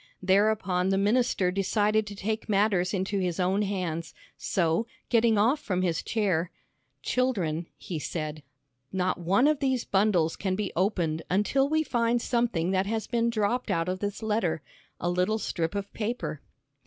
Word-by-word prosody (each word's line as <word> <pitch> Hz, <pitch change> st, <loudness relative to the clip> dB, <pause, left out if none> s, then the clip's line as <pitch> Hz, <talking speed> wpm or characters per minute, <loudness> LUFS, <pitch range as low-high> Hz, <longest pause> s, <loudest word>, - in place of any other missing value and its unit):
Thereupon 190 Hz, -1 st, +2 dB
the 195 Hz, -, +2 dB
minister 205 Hz, -2 st, +2 dB
decided 210 Hz, +2 st, +1 dB
to 205 Hz, -, -7 dB
take 215 Hz, +3 st, -3 dB
matters 195 Hz, -3 st, +2 dB
into 195 Hz, +1 st, -1 dB
his 180 Hz, -2 st, -1 dB
own 190 Hz, +3 st, +2 dB
hands. 180 Hz, -5 st, -3 dB, 0.2 s
So 170 Hz, +3 st, 0 dB, 0.2 s
getting 230 Hz, -2 st, +4 dB
off 240 Hz, +9 st, +3 dB
from 185 Hz, -7 st, -1 dB
his 170 Hz, -3 st, 0 dB
chair, 185 Hz, -7 st, 0 dB, 0.5 s
"Children," 180 Hz, -11 st, 0 dB
he 170 Hz, -4 st, -5 dB
said, 155 Hz, 0 st, -4 dB, 0.5 s
"not 185 Hz, -1 st, 0 dB
one 195 Hz, -, +3 dB
of 305 Hz, -2 st, +2 dB
these 260 Hz, -3 st, 0 dB
bundles 190 Hz, -5 st, +2 dB
can 190 Hz, -2 st, -1 dB
be 205 Hz, 0 st, -3 dB
opened 170 Hz, -4 st, 0 dB
until 240 Hz, +9 st, +2 dB
we 315 Hz, +1 st, +2 dB
find 240 Hz, -3 st, +1 dB
something 235 Hz, -8 st, 0 dB
that 190 Hz, 0 st, +1 dB
has 220 Hz, +1 st, -1 dB
been 235 Hz, 0 st, +1 dB
dropped 235 Hz, +2 st, 0 dB
out 165 Hz, 0 st, 0 dB
of 185 Hz, +1 st, -2 dB
this 205 Hz, +2 st, -4 dB
letter. 210 Hz, -8 st, 0 dB, 0.4 s
A -, -, -2 dB
little 180 Hz, +5 st, +1 dB
strip 170 Hz, -4 st, -2 dB
of 200 Hz, 0 st, -4 dB
paper." 220 Hz, -, -3 dB
195 Hz, 160 wpm, -28 LUFS, 180-220 Hz, 0.5 s, getting